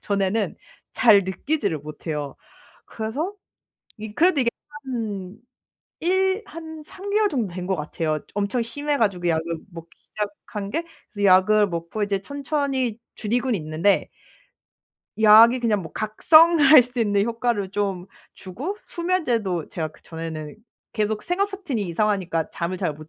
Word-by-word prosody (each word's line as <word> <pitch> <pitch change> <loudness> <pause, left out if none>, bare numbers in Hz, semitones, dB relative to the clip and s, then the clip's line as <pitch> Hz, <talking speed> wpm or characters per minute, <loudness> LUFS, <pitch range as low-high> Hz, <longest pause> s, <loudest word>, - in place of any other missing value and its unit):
전에는 200 +1 -1 0.4
잘 215 -4 +6
느끼지를 200 - -1
못해요. 150 -1 -5 0.5
그래서 270 - -4 0.7
이 215 0 -7
그래도 335 -4 +3
이게 235 - +2 0.3
한 215 -6 -5 0.6
일 380 +4 +1
한 320 -1 -9
3 395 +4 -9
개월 420 +1 +3
정도 225 - -2
된 180 0 -5
것 190 - +1
같아요. 155 0 -2
엄청 205 +4 -1
심해 285 +5 -2
가지고 190 -7 0
약을 160 -1 +1 0.3
먹기 165 0 -10 0.3
시작한 205 0 -5
게 330 +9 -2 0.3
그래서 205 -2 -1
약을 205 +2 +5
먹고 170 +4 -3
이제 200 -1 -1
천천히 275 -3 -2 0.2
줄이곤 245 +3 -1
있는데 160 +4 +1 1.1
약이 225 +3 +7
그냥 210 -5 +1
뭐 160 - -10
각성할 300 +5 +6
수 245 0 -5
있는 205 -2 +2
효과를 230 -4 -1
좀 195 -3 -2 0.3
주고 260 - -6
수면제도 240 - -1
제가 160 -2 -3
그 150 - -22
전에는 160 -2 -7 0.4
계속 215 -1 -1
생활패턴이 365 - -2
이상하니까 180 -3 -1
잠을 175 +2 -3
잘 175 -5 -1
못 155 +1 -13
210 Hz, 280 characters per minute, -23 LUFS, 185-270 Hz, 1.1 s, 약이